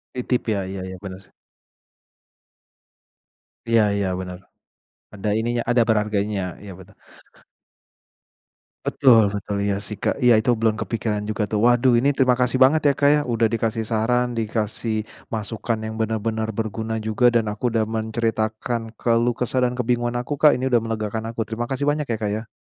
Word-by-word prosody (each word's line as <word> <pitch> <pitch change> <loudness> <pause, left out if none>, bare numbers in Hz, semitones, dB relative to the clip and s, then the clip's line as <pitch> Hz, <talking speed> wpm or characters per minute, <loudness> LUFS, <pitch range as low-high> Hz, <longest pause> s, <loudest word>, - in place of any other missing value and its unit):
Titip, 125 0 -1
ya. 100 - -1
Iya 95 - -5
iya, 95 - -7
benar 95 -1 -7
sih. - - -29 2.4
Iya 115 -1 +5
iya, 100 -2 0
benar. 90 -1 -6 0.7
Ada 105 +1 -3
ininya, 120 +1 -1
ada 120 -1 +4
berharganya, 105 -2 0 0.2
iya, 100 -1 -9
betul. 95 +2 -15 1.9
Betul 115 -6 +4
betul. 100 0 -3
Iya, 100 -1 0
sih, 105 0 -6
Kak. - - -1
Iya, 125 -1 +6
itu 115 +3 +1
belum 110 -1 +1
kepikiran 110 -2 -2
juga, 105 0 -2
tuh. 105 - 0
Waduh, 120 0 +4
ini 140 +3 +2
terima 130 -2 +3
kasih 125 0 +1
banget 150 +4 +4
ya 140 - +4
Kak 145 0 +5
ya, 150 - +2
udah 115 -2 +1
dikasih 115 -1 -1
saran, 120 +2 0
dikasih 110 0 -2 0.3
masukan 110 +1 -3
yang 110 0 -5
benar-benar 110 0 -1
berguna 110 +1 -3
juga, 110 +3 +3
dan 110 -2 +2
aku 115 +3 -2
udah 110 -1 +2
menceritakan 110 +1 -2
keluh 120 +1 +1
kesah 125 +1 +1
dan 125 - -1
kebingungan 120 0 -1
aku, 145 +3 -4
Kak. 150 -1 +6
Ini 130 +1 -1
udah 120 -2 +4
melegakan 110 -1 -3
aku. 115 - -3
Terima 115 +2 -3
kasih 135 +2 -2
banyak 150 0 0
ya 115 - -1
Kak 105 -1 -1
ya. 110 +2 -4
115 Hz, 165 wpm, -22 LUFS, 110-120 Hz, 2.4 s, Iya